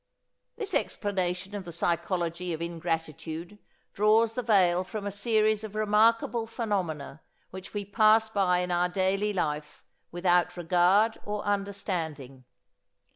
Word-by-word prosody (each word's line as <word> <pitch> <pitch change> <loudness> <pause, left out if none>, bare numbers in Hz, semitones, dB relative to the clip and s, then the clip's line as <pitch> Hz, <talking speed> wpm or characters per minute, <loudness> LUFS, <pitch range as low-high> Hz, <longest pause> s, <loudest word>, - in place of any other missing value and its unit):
This 420 -4 -4
explanation 190 -1 -1
of 205 -2 -4
the 175 - -8
psychology 170 +1 -1
of 160 - -4
ingratitude 165 +2 -4 0.3
draws 220 +2 +3
the 250 - -2
veil 185 -6 +3
from 205 +2 -6
a 200 - -2
series 215 +1 +1
of 215 -1 -7
remarkable 225 +2 +2
phenomena 190 - -3 0.3
which 190 +2 -10
we 205 -1 -2
pass 215 +2 +4
by 190 -4 +1
in 180 0 -3
our 175 0 +2
daily 195 +3 0
life 150 -6 -3 0.3
without 175 0 +1
regard 180 +6 +3
or 210 0 -4
understanding. 175 -10 -3
190 Hz, 130 wpm, -28 LUFS, 175-210 Hz, 0.3 s, pass